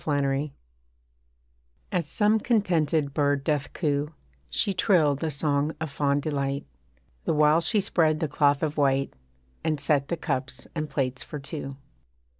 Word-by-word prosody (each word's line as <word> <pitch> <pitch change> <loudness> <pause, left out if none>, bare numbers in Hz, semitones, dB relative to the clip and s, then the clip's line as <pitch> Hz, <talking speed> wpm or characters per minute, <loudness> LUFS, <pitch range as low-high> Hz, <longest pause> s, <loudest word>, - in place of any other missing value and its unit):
NOON 140 0 +1 1.4
As 170 -4 0
some 215 +1 +3
contented 165 - +1
bird 145 -1 +1
doth 145 -1 -1
coo 150 -1 -1 0.3
She 195 - 0
trilled 160 -7 +2
a 160 - 0
song 145 +1 0
of 160 -2 -4
fond 140 0 +1
delight, 140 -2 -2 0.6
The - - +1
while 150 +2 +5
she 205 +6 +2
spread 160 -5 +2
the 160 - 0
cloth 145 0 +2
of 155 -1 -1
white, 135 -1 +2 0.5
And 155 -2 0
set 140 -1 +2
the 170 - -2
cups 130 -1 -3
and 155 -2 -3
plates 130 -2 -2
for 150 - -7
two. 140 -1 -6
150 Hz, 145 wpm, -26 LUFS, 140-160 Hz, 1.4 s, while